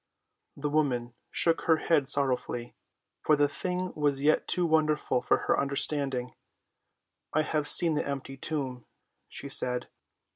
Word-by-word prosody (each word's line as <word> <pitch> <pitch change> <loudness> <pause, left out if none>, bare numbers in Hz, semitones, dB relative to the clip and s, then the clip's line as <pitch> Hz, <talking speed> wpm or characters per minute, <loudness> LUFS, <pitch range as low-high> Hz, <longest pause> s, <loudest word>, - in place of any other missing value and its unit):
The 145 +1 -3
woman 125 -6 -1 0.2
shook 165 -1 +1
her 160 -2 +4
head 155 -4 +1
sorrowfully, 130 -4 +1 0.5
for 155 - +3
the 145 0 +2
thing 180 +4 -4
was 145 -2 +1
yet 155 +1 +2
too 180 -1 +2
wonderful 155 -5 +1
for - - +2
her - - +1
understanding. 140 -2 -1 1.0
"I 155 - +3
have 150 -1 -1
seen 170 0 +5
the 150 - -2
empty 135 -1 -5
tomb," 130 -3 -4 0.4
she 140 - -6
said. 125 -2 +2
145 Hz, 140 wpm, -28 LUFS, 135-155 Hz, 1.0 s, seen